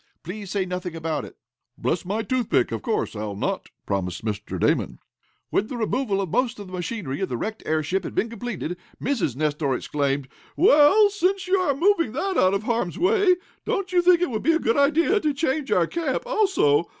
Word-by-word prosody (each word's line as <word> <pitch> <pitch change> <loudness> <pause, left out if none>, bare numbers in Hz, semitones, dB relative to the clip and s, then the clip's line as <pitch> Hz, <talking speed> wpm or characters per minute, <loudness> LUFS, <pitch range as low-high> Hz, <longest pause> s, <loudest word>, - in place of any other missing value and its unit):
Please 200 +3 -7
say 195 -1 -1
nothing 180 -2 -4
about 160 -1 -3
it." - - -13 0.4
"Bless - - -1
my 210 +4 -1
toothpick! 245 +1 +1
Of - - -3
course, 225 - -2
I'll 105 -1 -4
not," - - -3 0.2
promised 95 0 -3
Mr. 105 -1 -4
Damon. - - +1 0.5
When 205 - +1
the 250 - -5
removal 220 -3 0
of 190 - -3
most 250 -1 +1
of 205 - -8
the 185 - -12
machinery 175 - -4
of - - -1
the 125 - -2
wrecked 215 - -4
airship 160 +5 0
had - - -6
been 225 - +1
completed, 220 -6 -5 0.2
Mrs. 230 - -1
Nestor 150 -2 0
exclaimed: 140 0 -1 0.3
"Well, 375 +5 +6
since 390 -1 0
you 380 +1 +3
are 365 -7 +1
moving 335 - +2
that 380 +8 -1
out 185 - +4
of 200 - -2
harm's 225 -6 -1
way, 385 0 +4 0.3
don't 390 -1 -2
you 355 - +5
think 350 0 +5
it 355 - 0
would 220 - -2
be 325 +5 +3
a - - +3
good 230 - +1
idea 315 +8 +3
to 305 -6 0
change 280 -1 -1
our 175 - +4
camp, 295 - -2
also? 385 - +2
225 Hz, 200 wpm, -24 LUFS, -, 0.5 s, Well